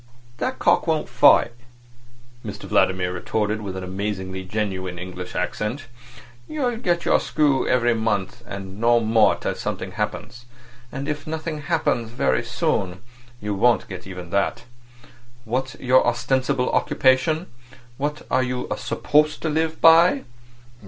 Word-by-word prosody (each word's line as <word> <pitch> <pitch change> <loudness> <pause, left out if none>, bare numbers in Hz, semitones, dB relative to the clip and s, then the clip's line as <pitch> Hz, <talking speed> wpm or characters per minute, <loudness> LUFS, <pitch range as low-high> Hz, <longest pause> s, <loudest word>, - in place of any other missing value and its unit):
"That 260 0 -2
cock - - +2
won't 160 -2 0
fight," 120 -1 +5 0.9
Mr 105 -3 -7
Vladimir 90 -1 +1
retorted, 105 +4 -2
with 95 -2 -5
an 95 - -5
amazingly 95 0 -4
genuine 95 -2 -3
English 90 0 -7
accent. 115 +7 -2 0.6
"You'll 255 -6 -1
get 175 -7 0
your - - +4
screw 145 -3 +1
every 120 -1 +3
month, 110 -4 -2
and 100 0 -7
no 120 0 +5
more 110 -1 +4
till - - -3
something - - -4
happens. 120 0 -5 0.5
And 140 +1 -5
if 150 -1 -4
nothing 155 -1 -4
happens 120 -4 0
very 120 +2 0
soon 90 +2 -2 0.4
you 105 -2 -3
won't 115 +4 +2
get 95 -3 -8
even 90 -2 -8
that. 100 +3 0 0.8
What's 130 +4 -2
your 130 +1 +3
ostensible 130 +2 0
occupation? 135 +6 +2 0.5
What 150 +2 -3
are 130 - +3
you 125 0 -3
supposed 150 +1 +1
to 160 - 0
live 160 +1 -1
by?" 170 +10 +6
120 Hz, 135 wpm, -23 LUFS, 100-145 Hz, 0.9 s, by